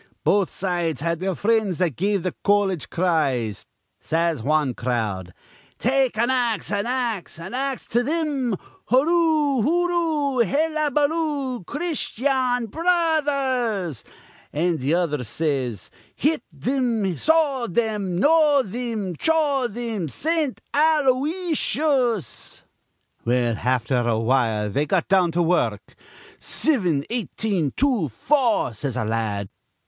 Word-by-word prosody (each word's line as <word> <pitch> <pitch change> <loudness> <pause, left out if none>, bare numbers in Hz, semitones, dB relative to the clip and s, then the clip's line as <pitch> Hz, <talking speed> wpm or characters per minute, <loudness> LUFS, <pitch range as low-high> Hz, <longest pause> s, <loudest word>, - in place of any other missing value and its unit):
Both 200 -3 +3
sides 175 -6 -2
had 170 +1 -1
their 190 0 -1
frinds 215 -4 +1
that 175 -7 0
give 200 0 0
th' 185 - -2
colledge 200 -7 +1
cries. 140 - 0 0.3
Says 165 -4 0
wan 145 0 +1
crowd: 110 -8 -2 0.5
'Take 260 -2 +1
an 235 +3 +2
ax, 240 -6 0
an 205 +2 -1
ax, 240 -6 -2
an 170 +5 -8
ax 270 0 -2
to 240 +2 +2
thim. 285 -6 -1 0.3
Hooroo, 300 0 +3
hooroo, 320 -3 +1
hellabaloo. 295 - 0
Christyan 265 -6 -1
Bro 330 - -6
others!' 270 - +1 0.5
an' 165 +2 0
th' 135 +3 -1
other 165 -6 0
says, 130 - -2 0.2
'Hit 305 -1 +1 0.2
thim, 230 - 0
saw 290 - +2
thim, 205 -3 -1
gnaw 295 +1 +4
thim, 215 -4 -4
chaw 295 - +2
thim, 225 -7 -4
Saint 315 - -1
Alo 290 -3 +3
ysius!' 295 - -1 0.6
Well, 120 -1 +1
afther 125 +1 0
awhile 115 -2 +1
they 145 +7 0
got 175 +1 +1
down 185 -2 +3
to 175 +1 +2
wur 175 +2 +3
ruk. - - -16 0.4
'Sivin, 180 - 0
eighteen, 210 - -1
two, 250 - +1
four,' 240 - +1
says 125 +3 -4
a 125 - -1
la 110 +1 -1
ad. 100 -3 -2
220 Hz, 120 wpm, -23 LUFS, -, 0.6 s, gnaw